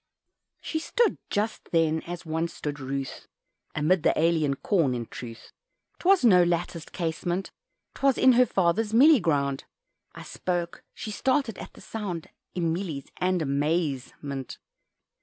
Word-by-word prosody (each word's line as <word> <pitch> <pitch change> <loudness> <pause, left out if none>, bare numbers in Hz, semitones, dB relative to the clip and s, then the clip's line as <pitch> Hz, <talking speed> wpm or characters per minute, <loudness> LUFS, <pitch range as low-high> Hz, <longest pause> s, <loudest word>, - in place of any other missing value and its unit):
She 315 - -2
stood 470 +8 +1
just 215 +1 -2
then 160 -1 +2
as 175 0 -6
once 160 +1 -2
stood 150 0 -4
Ruth, 135 0 -5 0.5
"Amid 165 +4 +2
the - - +2
alien 160 -4 +2
corn" 150 -5 +1
in 120 -1 -3
truth 115 0 -10 0.5
'Twas 375 -6 +4
at - - +8
no 180 -4 +7
latticed 170 -1 -2
casement 175 +2 -2 0.4
'Twas 275 -2 +2
in 260 - +6
her 250 0 +5
father's 205 +5 +1
"mealie" 285 +1 +7
ground 140 -5 0 0.5
I - - -8
spoke 175 -2 -3
she 215 - -6
started 255 -1 0
at - - -9
the - - -14
sound 195 -7 -5 0.3
In 165 -3 0
mealies 165 -7 -5
and 180 -1 +1
a_maze_ment. 140 -2 -2
170 Hz, 140 wpm, -27 LUFS, 150-205 Hz, 0.5 s, at